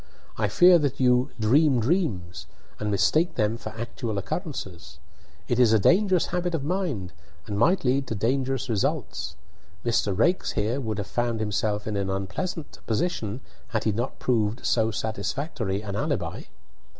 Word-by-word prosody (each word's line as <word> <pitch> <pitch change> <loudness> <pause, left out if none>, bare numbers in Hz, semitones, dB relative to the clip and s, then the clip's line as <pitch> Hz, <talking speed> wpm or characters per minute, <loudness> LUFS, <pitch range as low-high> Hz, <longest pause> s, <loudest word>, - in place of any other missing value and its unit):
I 110 - 0
fear 175 - +6
that 140 -2 -1
you 125 -1 +3
'dream 130 +4 +4
dreams,' 100 - -1 0.3
and 105 - -2
mistake 105 - +2
them 110 -1 +1
for 115 - -7
actual 115 -2 -4
occurrences. 95 - -5 0.5
It 120 - 0
is 120 -3 +5
a - - +6
dangerous 185 - +4
habit 175 -1 0
of 145 - -2
mind, 150 - -2 0.3
and 105 - -4
might 175 - +3
lead 135 +1 +2
to 115 - -3
dangerous 130 +4 0
results. 100 -6 -1 0.5
Mr. 105 -5 +1
Raikes 175 - +2
here 115 +6 0
would 110 -4 -3
have 100 - -2
found 120 +2 -1
himself 105 0 -1
in 110 - -3
an 100 -1 -1
unpleasant 95 - -4
position 115 - -1 0.3
had 110 -3 -2
he 110 - +2
not 120 +6 -3
proved 110 -3 0
so 110 -1 +2
satisfactory 110 - -3
an 100 -2 -4
alibi." - - -2
115 Hz, 155 wpm, -26 LUFS, 105-140 Hz, 0.5 s, fear